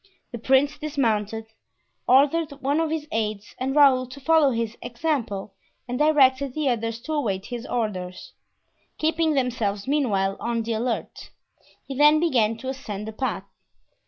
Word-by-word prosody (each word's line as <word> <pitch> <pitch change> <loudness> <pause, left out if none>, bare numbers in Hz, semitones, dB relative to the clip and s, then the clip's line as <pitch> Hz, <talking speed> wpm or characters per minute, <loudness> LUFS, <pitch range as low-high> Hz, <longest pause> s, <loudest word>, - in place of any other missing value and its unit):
The 235 - -6
prince 275 +5 +2
dismounted, 225 -8 -1 0.6
ordered 290 +4 +4
one 280 +2 -1
of 325 -1 0
his 310 -1 -3
aids 215 -2 -3
and 265 +2 -2
Raoul 265 -3 +5
to 255 +3 -11
follow 315 0 +4
his 230 -2 -2
example, 235 -6 -3 0.3
and 245 0 -3
directed 280 -3 +3
the 305 -3 +1
others 230 -1 -2
to 310 +5 -5
await 200 -10 -1
his 240 -1 -6
orders, 185 -6 -4 0.6
keeping 320 0 +1
themselves 230 -6 -1
meanwhile 205 -10 +1
on 235 -1 -1
the 230 +1 -2
alert. 230 +1 -3 0.6
He 270 - -6
then 295 +2 +6
began 235 -9 +2
to 260 +3 -6
ascend 215 -6 -6
the 220 - -6
path. 215 -6 -2
255 Hz, 150 wpm, -24 LUFS, 220-290 Hz, 0.6 s, then